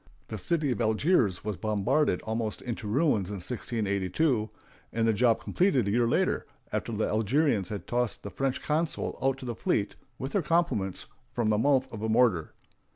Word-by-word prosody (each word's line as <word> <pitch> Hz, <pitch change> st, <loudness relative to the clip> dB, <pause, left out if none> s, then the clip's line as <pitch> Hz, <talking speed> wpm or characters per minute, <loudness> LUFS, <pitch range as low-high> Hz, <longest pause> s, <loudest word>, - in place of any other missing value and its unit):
The 110 Hz, -, -4 dB
city 155 Hz, -, 0 dB
of 120 Hz, -, -1 dB
Algiers 110 Hz, -, +2 dB
was 105 Hz, -4 st, -2 dB
bombarded 105 Hz, +2 st, +1 dB
almost 110 Hz, -1 st, -3 dB
into 120 Hz, -2 st, -4 dB
ruins 110 Hz, -, +2 dB
in 105 Hz, -, -4 dB
1682, 110 Hz, -, -1 dB, 0.4 s
and 115 Hz, 0 st, +1 dB
the 110 Hz, -, +4 dB
job 115 Hz, +1 st, +3 dB
completed 135 Hz, -, +1 dB
a -, -, +1 dB
year 120 Hz, +2 st, +3 dB
later, -, -, +1 dB, 0.3 s
after -, -, -2 dB
the -, -, 0 dB
Algerians 110 Hz, -, +1 dB
had 105 Hz, -2 st, -5 dB
tossed 120 Hz, -2 st, -1 dB
the 100 Hz, -, -6 dB
French 135 Hz, -1 st, -2 dB
consul 155 Hz, +2 st, -1 dB
out 135 Hz, 0 st, +1 dB
to 135 Hz, -, -9 dB
the 120 Hz, -, -2 dB
fleet, 105 Hz, -2 st, 0 dB, 0.2 s
with 135 Hz, +1 st, -4 dB
their 200 Hz, -, +2 dB
compliments, 165 Hz, -, 0 dB, 0.3 s
from 115 Hz, -3 st, 0 dB
the 105 Hz, -1 st, +2 dB
mouth 135 Hz, +1 st, +3 dB
of 110 Hz, -, -6 dB
a 110 Hz, -, -1 dB
mortar. 110 Hz, -8 st, +2 dB
115 Hz, 180 wpm, -28 LUFS, 105-135 Hz, 0.4 s, the